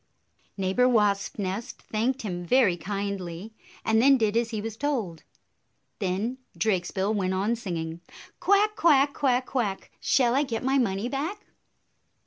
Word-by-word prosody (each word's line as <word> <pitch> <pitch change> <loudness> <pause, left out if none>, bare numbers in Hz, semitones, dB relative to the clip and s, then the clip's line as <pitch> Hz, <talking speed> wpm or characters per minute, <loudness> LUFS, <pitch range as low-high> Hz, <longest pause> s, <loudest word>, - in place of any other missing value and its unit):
Neighbor 195 +7 +2
Wasp 205 -4 +1
nest 200 +5 -4
thanked 245 +5 -1
him 175 -4 -4
very 215 -2 +4
kindly, 195 +1 -5 0.3
and 220 0 +3
then 275 +2 +6
did 220 -3 +1
as 230 0 +1
he 220 -2 -3
was 220 +1 -5
told. 225 - -2 0.8
Then 210 +6 -2 0.2
Drakesbill 190 0 0
went 190 -3 0
on, 205 +5 +1
singing, 170 -6 -5 0.4
"Quack, 410 +2 +3
quack! 285 -6 +4
Quack, 255 -3 +1
quack! 220 -8 -2
Shall 245 -3 +3
I 275 - +3
get 240 -6 -3
my 270 +1 +2
money 200 -2 0
back?" 315 +11 -4
220 Hz, 140 wpm, -26 LUFS, 195-260 Hz, 0.8 s, then